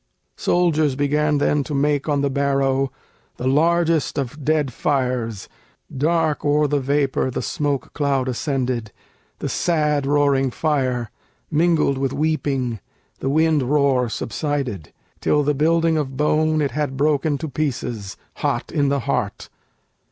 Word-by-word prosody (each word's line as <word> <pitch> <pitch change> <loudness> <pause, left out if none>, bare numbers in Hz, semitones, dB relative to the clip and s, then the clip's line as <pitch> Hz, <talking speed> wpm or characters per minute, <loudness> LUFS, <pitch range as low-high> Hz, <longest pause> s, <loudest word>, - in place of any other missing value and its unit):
Soldiers 155 -5 +2
began 150 +1 +1
then 145 0 +2
to 145 - -4
make 145 +1 +1
on 145 -1 +1
the 140 - +1
barrow 135 -1 +1 0.5
The 125 - -5
largest 165 +1 +2
of 140 +2 -4
dead 150 -3 +1
fires: 125 -7 -1 0.5
dark 155 +2 +1
o'er 150 +1 +3
the 145 0 +1
vapor 140 -1 0
The 125 - -3
smoke 145 -5 -2
cloud 140 -3 0
ascended; 125 -3 -2 0.5
the - - -4
sad 150 -4 +1
roaring 140 -2 +3
fire, 130 -6 -1 0.4
Mingled 155 -3 +2
with 135 -1 -1
weeping 140 -6 -1 0.4
(the 135 - -2
wind 155 +1 +3
roar 135 -2 +2
subsided) 120 - -3 0.3
Till 150 - +2
the 150 +1 +1
building 165 +2 +2
of 135 -3 -3
bone 155 +1 +2
it 140 - -1
had 140 0 -2
broken 145 0 +1
to 160 - -5
pieces, 125 -8 -3 0.2
Hot - - -2
in 145 -3 +1
the 140 -1 0
heart. - - -2
145 Hz, 135 wpm, -21 LUFS, 135-150 Hz, 0.5 s, o'er